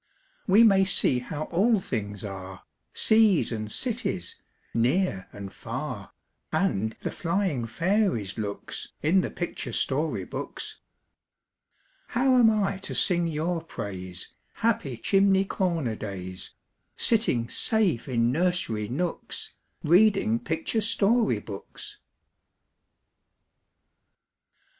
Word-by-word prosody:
We 205 Hz, +4 st, +7 dB
may 195 Hz, -4 st, +6 dB
see 160 Hz, -9 st, +3 dB
how 145 Hz, +4 st, -5 dB
all 210 Hz, +5 st, +3 dB
things 105 Hz, -, -4 dB
are, 95 Hz, -1 st, -8 dB, 0.3 s
Seas 220 Hz, -8 st, +4 dB
and 110 Hz, -2 st, -4 dB
cities, 230 Hz, -, -2 dB, 0.3 s
near 120 Hz, -, +1 dB
and 100 Hz, -1 st, -8 dB
far, -, -, -6 dB, 0.4 s
And 110 Hz, +3 st, 0 dB
the -, -, -3 dB
flying 170 Hz, -, -1 dB
fairies' 170 Hz, -, 0 dB
looks, 105 Hz, -3 st, -5 dB
In 175 Hz, +5 st, +4 dB
the -, -, -3 dB
picture 175 Hz, -, -4 dB
story 135 Hz, -, -1 dB
books. -, -, -6 dB, 1.3 s
How 255 Hz, +2 st, +2 dB
am 235 Hz, -3 st, +7 dB
I 200 Hz, -3 st, 0 dB
to 195 Hz, -, -4 dB
sing 175 Hz, -2 st, +3 dB
your 165 Hz, +2 st, -1 dB
praise, 95 Hz, -, -6 dB, 0.2 s
Happy 175 Hz, -, 0 dB
chimney 195 Hz, -, +3 dB
corner 170 Hz, -, -1 dB
days, 95 Hz, -2 st, -7 dB, 0.4 s
Sitting 210 Hz, -, +2 dB
safe 190 Hz, -, +1 dB
in 120 Hz, -1 st, +2 dB
nursery 160 Hz, -, 0 dB
nooks, 160 Hz, +9 st, -4 dB, 0.3 s
Reading 180 Hz, -, +4 dB
picture 160 Hz, -, -1 dB
story 220 Hz, -, +2 dB
books? 100 Hz, -1 st, -8 dB
165 Hz, 105 wpm, -27 LUFS, -, 1.3 s, We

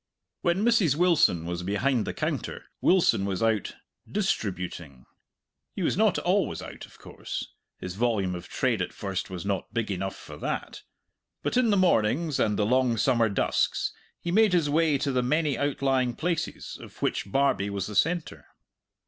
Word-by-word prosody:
When 175 Hz, +5 st, +1 dB
Mrs. 215 Hz, -, +4 dB
Wilson 160 Hz, -, +3 dB
was 85 Hz, 0 st, -3 dB
behind 110 Hz, +6 st, 0 dB
the -, -, -2 dB
counter, -, -, -3 dB, 0.2 s
Wilson 175 Hz, -, +4 dB
was 100 Hz, +1 st, -2 dB
out 110 Hz, -3 st, 0 dB, 0.4 s
"distributing." 90 Hz, -, -3 dB, 0.7 s
He -, -, -2 dB
was -, -, +1 dB
not -, -, +3 dB
always -, -, +1 dB
out, -, -, -9 dB
of -, -, -19 dB
course -, -, -6 dB, 0.3 s
his 90 Hz, -, -6 dB
volume 105 Hz, -4 st, 0 dB
of 90 Hz, 0 st, -7 dB
trade 120 Hz, -7 st, 0 dB
at 90 Hz, -, -3 dB
first 95 Hz, -3 st, -4 dB
was 90 Hz, -1 st, -6 dB
not 100 Hz, -1 st, -2 dB
big 115 Hz, -3 st, -1 dB
enough 95 Hz, 0 st, -3 dB
for -, -, -11 dB
that; -, -, -4 dB, 0.6 s
but -, -, -1 dB
in 250 Hz, -2 st, +3 dB
the 205 Hz, -, +3 dB
mornings, 155 Hz, -, +2 dB
and 105 Hz, -1 st, +2 dB
the 105 Hz, -, +2 dB
long 125 Hz, 0 st, +2 dB
summer 115 Hz, -1 st, +3 dB
dusks, 100 Hz, -, 0 dB, 0.3 s
he 175 Hz, -, -3 dB
made 215 Hz, 0 st, +4 dB
his 160 Hz, -5 st, +2 dB
way 155 Hz, -1 st, +3 dB
to 140 Hz, +1 st, -1 dB
the 130 Hz, -1 st, +1 dB
many 150 Hz, +3 st, +1 dB
outlying 135 Hz, -3 st, 0 dB
places 170 Hz, 0 st, -3 dB
of -, -, -13 dB
which 100 Hz, -, -1 dB
Barbie 135 Hz, -7 st, +2 dB
was 100 Hz, -1 st, -3 dB
the 105 Hz, -, -6 dB
centre. 165 Hz, -, 0 dB
125 Hz, 170 wpm, -27 LUFS, 100-160 Hz, 0.7 s, Mrs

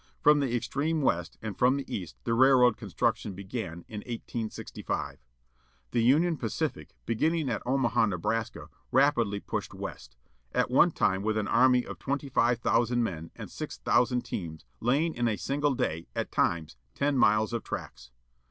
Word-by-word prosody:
From 150 Hz, 0 st, +5 dB
the 130 Hz, -4 st, 0 dB
extreme 150 Hz, +6 st, -1 dB
West, 85 Hz, -9 st, 0 dB
and 105 Hz, -3 st, -4 dB
from 130 Hz, +2 st, +3 dB
the 140 Hz, -, -4 dB
East, 90 Hz, -5 st, -6 dB
the 115 Hz, -, 0 dB
railroad 125 Hz, -1 st, +6 dB
construction 100 Hz, -, -1 dB
began, 95 Hz, -3 st, -6 dB
in 105 Hz, -, -6 dB
1865. 115 Hz, -1 st, -5 dB, 0.7 s
The 120 Hz, -, +2 dB
Union 155 Hz, +8 st, +3 dB
Pacific, 115 Hz, -5 st, -3 dB
beginning 155 Hz, +5 st, 0 dB
at -, -, -2 dB
Omaha, 120 Hz, -4 st, +2 dB
Nebraska, 105 Hz, +4 st, -2 dB, 0.2 s
rapidly 120 Hz, -7 st, +3 dB
pushed -, -, -5 dB
west. -, -, -8 dB, 0.4 s
At -, -, +1 dB
one -, -, +6 dB
time 95 Hz, 0 st, +1 dB
with 110 Hz, +1 st, 0 dB
an 105 Hz, -, -1 dB
army 125 Hz, -1 st, +4 dB
of -, -, -8 dB
twenty 140 Hz, +1 st, -3 dB
five 120 Hz, -1 st, +3 dB
thousand 120 Hz, +1 st, +2 dB
men, 85 Hz, -6 st, -4 dB
and -, -, -9 dB
six -, -, -6 dB
thousand 125 Hz, 0 st, +2 dB
teams, 80 Hz, -6 st, -6 dB
laying 145 Hz, +8 st, +1 dB
in 120 Hz, 0 st, 0 dB
a 110 Hz, -, +1 dB
single 145 Hz, 0 st, 0 dB
day, 80 Hz, -7 st, -2 dB
at -, -, -2 dB
times, 80 Hz, -7 st, 0 dB, 0.2 s
ten 145 Hz, 0 st, +1 dB
miles 110 Hz, -2 st, +3 dB
of 115 Hz, -, -2 dB
tracks. 60 Hz, 0 st, -7 dB
120 Hz, 160 wpm, -29 LUFS, 100-135 Hz, 0.7 s, railroad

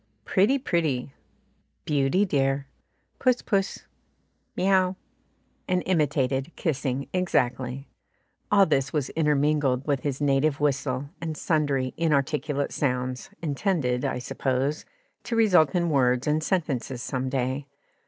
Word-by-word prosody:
"Pretty, 205 Hz, +9 st, +3 dB
pretty," 155 Hz, -, -1 dB, 0.7 s
"Beauty, 145 Hz, +6 st, +2 dB
dear," 135 Hz, -4 st, 0 dB, 0.5 s
"Puss, 255 Hz, -2 st, +2 dB
puss," 195 Hz, -2 st, -1 dB, 0.7 s
"Miaow," 185 Hz, -1 st, +3 dB, 0.7 s
and 180 Hz, -1 st, +1 dB
imitated 140 Hz, -4 st, +1 dB
kissing 140 Hz, -3 st, -2 dB
exactly. 130 Hz, -7 st, 0 dB, 0.6 s
All 200 Hz, -1 st, +6 dB
this 135 Hz, -4 st, +1 dB
was 145 Hz, -4 st, -1 dB
intermingled 150 Hz, -4 st, +1 dB
with 145 Hz, -3 st, +1 dB
his 140 Hz, 0 st, -3 dB
native 140 Hz, 0 st, +2 dB
whistle 140 Hz, -1 st, -1 dB
and 160 Hz, -2 st, -4 dB
sundry 140 Hz, -5 st, 0 dB
inarticulate 150 Hz, -2 st, 0 dB
sounds, 125 Hz, -2 st, -2 dB
intended, 145 Hz, -5 st, 0 dB
I -, -, -1 dB
suppose, 130 Hz, +3 st, -2 dB, 0.4 s
to 235 Hz, -, -2 dB
result 185 Hz, -10 st, +4 dB
in 170 Hz, -2 st, +1 dB
words 125 Hz, -2 st, +2 dB
and 150 Hz, +1 st, +1 dB
sentences 135 Hz, -, -1 dB
some 130 Hz, 0 st, -2 dB
day. 130 Hz, +2 st, -2 dB
145 Hz, 115 wpm, -26 LUFS, 130-165 Hz, 0.7 s, All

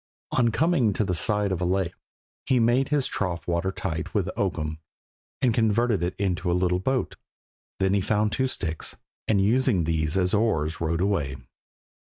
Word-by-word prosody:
On 120 Hz, -2 st, +3 dB
coming 135 Hz, -, +2 dB
to 110 Hz, -, 0 dB
the 90 Hz, -, -1 dB
side 105 Hz, +4 st, +2 dB
of 90 Hz, -2 st, -2 dB
a -, -, +1 dB
lake 90 Hz, -1 st, 0 dB, 0.5 s
he 130 Hz, -, +3 dB
made 120 Hz, +3 st, +3 dB
his 145 Hz, -3 st, +2 dB
trough 90 Hz, -4 st, -3 dB
water 85 Hz, +2 st, 0 dB
tight 85 Hz, -2 st, -4 dB
with 95 Hz, -3 st, 0 dB
oakum, 80 Hz, -6 st, -2 dB, 0.6 s
and 125 Hz, -3 st, +4 dB
converted 110 Hz, -2 st, +2 dB
it 90 Hz, +1 st, -1 dB
into 90 Hz, -3 st, -1 dB
a 90 Hz, -, +2 dB
little 90 Hz, 0 st, +1 dB
boat. 130 Hz, +6 st, -1 dB, 0.6 s
Then 95 Hz, 0 st, +2 dB
he 100 Hz, -, +2 dB
found 105 Hz, +2 st, +1 dB
two 130 Hz, +4 st, 0 dB
sticks, 80 Hz, -10 st, -4 dB, 0.3 s
and 105 Hz, -3 st, +3 dB
using 110 Hz, -2 st, +3 dB
these 80 Hz, +1 st, 0 dB
as 90 Hz, -1 st, +1 dB
oars 90 Hz, -8 st, +1 dB
rowed 85 Hz, +1 st, 0 dB
away. 85 Hz, -9 st, 0 dB
95 Hz, 175 wpm, -25 LUFS, 85-110 Hz, 0.6 s, and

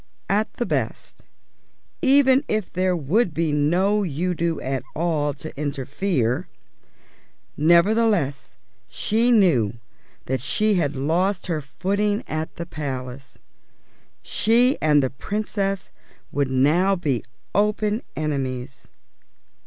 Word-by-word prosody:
At 210 Hz, +1 st, +1 dB
the 240 Hz, -, -2 dB
best, -, -, -3 dB, 0.8 s
even 270 Hz, -2 st, +5 dB
if 215 Hz, -3 st, -2 dB
there 185 Hz, 0 st, +1 dB
would 175 Hz, -, +1 dB
be 165 Hz, -2 st, 0 dB
no 180 Hz, +8 st, +2 dB
Udo 170 Hz, 0 st, -1 dB
at 135 Hz, 0 st, -2 dB
all 155 Hz, -3 st, 0 dB
to 155 Hz, -, -8 dB
interfere, 145 Hz, -, -1 dB, 1.1 s
nevertheless 170 Hz, -, +2 dB, 0.3 s
she 220 Hz, -, 0 dB
knew 165 Hz, -, +3 dB, 0.5 s
that 130 Hz, 0 st, -1 dB
she 215 Hz, -, +1 dB
had 155 Hz, -6 st, 0 dB
lost 175 Hz, +8 st, 0 dB
her 165 Hz, -4 st, -2 dB
footing 200 Hz, -, -1 dB
at 155 Hz, +1 st, -4 dB
the 170 Hz, -, -5 dB
Palace. 135 Hz, -4 st, -6 dB, 0.9 s
She 240 Hz, +5 st, +3 dB
and 150 Hz, -2 st, +4 dB
the 130 Hz, -, -1 dB
Princess 195 Hz, +4 st, -3 dB, 0.4 s
would 140 Hz, -2 st, 0 dB
now 155 Hz, +9 st, +3 dB
be 145 Hz, -10 st, -1 dB, 0.3 s
open 210 Hz, +2 st, +1 dB
enemies. 135 Hz, -3 st, -3 dB
170 Hz, 105 wpm, -23 LUFS, 140-205 Hz, 1.1 s, even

